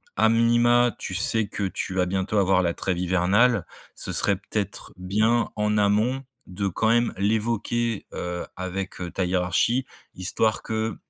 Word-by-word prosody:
A - - +4
minima, 120 +1 +3
tu 95 - -5
sais 110 +2 +2
que 100 - -4
tu 95 -1 -3
vas 90 -1 +2
bientôt 95 +3 -1
avoir 95 -1 +3
la 85 -2 -1
trêve 90 -2 -2
hivernale, 95 +5 +2 0.3
ce - - -1
serait 100 - +4
peut-être 100 +1 -4
bien 110 +6 +1
en 105 0 +1
amont 110 +6 +1 0.2
de 95 +2 -3
quand 110 +4 0
même 120 +1 +2
l'évoquer, 110 +2 -1
heu, 90 0 -4
avec, 95 0 -5
heu, 90 - -4
ta 95 - -1
hiérarchie, 95 +8 +1 0.3
histoire 105 +4 0
que 110 -1 -2
105 Hz, 155 wpm, -24 LUFS, 95-115 Hz, 0.3 s, A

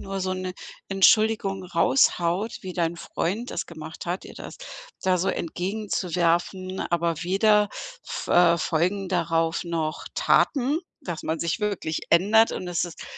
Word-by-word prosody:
nur 195 0 -4
so 185 0 -1
'ne 185 0 -4 0.4
Entschuldigung 195 0 +3
raushaut, 175 - +2
wie 185 - -6
dein 170 -1 -1
Freund 205 +7 -3
das - - -3
gemacht 160 0 -9
hat, 175 +2 -3
dir - - -11
das - - -9 0.4
da 185 -1 +2
so 185 - 0
entgegenzuwerfen, 185 0 -1
aber 170 -1 -1
weder 210 +3 +3 0.4
f - - -5
äh, 170 -1 +5
folgen 180 +5 0
darauf 165 -2 0
noch 165 -2 -3
Taten, 280 +3 +2 0.2
dass 170 -4 -5
man 160 +1 -2
sich 170 +5 -1
wirklich 200 -7 -2
ändert 210 +6 +5
und 185 - -5
es 175 -1 0
ist 175 -2 -9
180 Hz, 145 wpm, -25 LUFS, 170-195 Hz, 0.4 s, äh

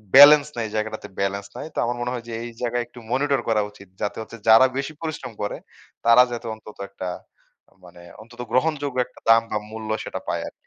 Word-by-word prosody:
Balance 145 +1 +10
নাই 110 -2 -1
জায়গাটাতে, 110 0 -3
balance 100 +1 -1
নাই। - - -5
তো - - -13
আমার 120 +1 -1
মনে 125 0 -1
হয় 120 -2 -5
যে, 115 - -6
এই 120 - -5
জায়গায় 120 0 0
একটু 120 - -13
মনিটর 140 0 +2
করা 110 -2 +3
উচিত 100 -1 -16
যাতে 105 - -2
হচ্ছে 115 +1 -9
যারা 115 +4 +8
বেশি 140 +3 -3
পরিশ্রম 155 -6 -5
করে, 105 - -2 0.5
তারা 115 +2 +8
যাতে 120 0 -5
অন্তত 110 -1 -14
একটা 95 -2 -5 0.8
মানে 85 - -14 0.2
অন্তত 120 +2 -16
গ্রহণযোগ্য 145 -2 0
একটা - - -19
দাম 115 0 +8
বা 105 - +1
মূল্য 110 -1 -7
সেটা - - -5
পায় - - -1
আরকি। - - -7
115 Hz, 205 wpm, -23 LUFS, 110-130 Hz, 0.8 s, Balance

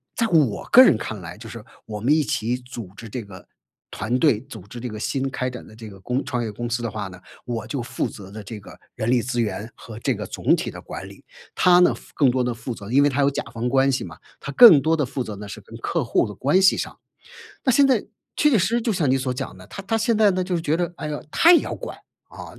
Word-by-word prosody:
在 230 - +1
我 150 - +2
个 255 - +10
人 255 - +5
看 110 - -5
来 85 +1 -9
就 115 -1 -10
是 115 -2 -9 0.2
我 105 -1 -5
们 130 +8 +2
一 155 - +3
起 120 -4 -1
组 125 -5 -9
织 115 - -10
这 120 +2 -5
个 100 -3 -13 0.4
团 120 +4 -2
队、 140 -9 +3
组 130 -5 -11
织 120 +4 -9
这 125 - -5
个 110 -1 -7
新 135 +3 -1
开 130 -1 -2
展 125 -1 -9
的 110 - -15
这 110 -1 -10
个 95 -2 -13
公 125 +7 -2
创 125 -4 -2
业 110 - -4
公 120 +3 -5
司 120 0 -2
的 115 - -2
话 105 -1 -4
呢， 95 -1 -12 0.3
我 115 -3 -4
就 125 +2 -3
负 120 - -3
责 95 -2 -11
的 110 0 -8
这 110 +2 -8
个 100 - -14 0.2
人 110 - -2
力 125 0 +4
资 120 +1 -1
源 110 0 -3
和 110 -2 -11
这 135 - 0
个 105 -2 -5
总 - - +1
体 - - -4
的 - - -9
管 - - -8
理。 - - -16 0.3
他 180 -1 +5
呢 180 - +5
负 - - -16
更 140 -4 +3
多 125 0 0
地 125 - -1
负 115 +1 -6
责， 100 +1 -9
因 135 +3 +5
为 145 - +4
他 140 +1 0
有 140 0 +3
甲 - - -3
方 120 +1 -3
关 135 +2 +3
系 130 - -1
嘛， - - -10 0.2
他 145 - -6
更 165 - +9
多 160 +4 +2
地 150 -4 0
负 130 0 -3
责 110 -3 -7
呢 105 - -8
是 110 - -8
跟 115 - -13
客 165 +6 -1
户 115 - +1
的 105 - -8
关 145 - +2
系 190 - +5
上。 - - -5 0.6
那 265 - +3
现 275 +3 +5
在， 250 -6 +3 0.3
确 300 - +4
确 245 - +4
实 180 - +2
实 235 +1 0
就 225 - 0
像 155 -6 +1
你 130 - +3
所 130 -1 -2
讲 125 - -6
的， 95 - -13
他 195 - -8
他 225 +4 0
现 225 +1 +1
在 215 -1 +5
呢 185 0 -1
就 180 -1 -2
是 - - -3
觉 160 -1 0
得， 175 +1 -2
哎 - - -5
哟， 150 -1 -5
他 340 +2 +6
也 340 - +6
要 - - -5
管， - - -7 0.3
啊， - - -10
125 Hz, 310 characters per minute, -23 LUFS, 110-160 Hz, 0.6 s, 个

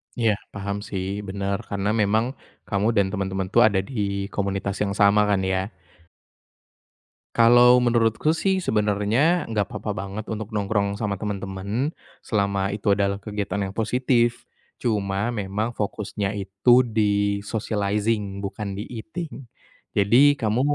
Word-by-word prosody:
Iya 115 -3 +2 0.2
paham 100 0 -3
sih, 95 -2 -3 0.2
benar 100 0 -2
karena 100 0 -1
memang, 110 +3 +2 0.4
kamu 100 0 0
dan 100 -2 +3
teman-teman 95 -2 -2
tuh 120 - +6
ada 100 -3 +1
di 100 -5 -2
komunitas 100 -1 -2
yang 100 -1 -1
sama 100 +1 +5
kan 100 -2 +3
ya? 95 - +1 1.8
Kalau 120 +1 +7
menurutku 115 +4 +2
sih 190 +3 0
sebenarnya 110 - +2
enggak 105 -3 0
apa-apa 105 0 -5
banget 100 +2 -5
untuk 110 0 -5
nongkrong 100 -1 0
sama 100 -2 -3
teman-teman, 100 +6 -3 0.3
selama 100 -2 0
itu 105 +1 0
adalah 100 -1 0
kegiatan 100 -2 -3
yang 95 - -9
positif, 120 +1 +1 0.3
cuma 100 -2 -1
memang 105 +2 -3
fokusnya 100 -1 -3
itu 100 +6 +3
di-socializing 105 -1 0
bukan 100 0 -5
di-eating, 135 - -7 0.5
jadi 125 +8 +5
kamu 110 +1 0
105 Hz, 125 wpm, -24 LUFS, 100-115 Hz, 1.8 s, Kalau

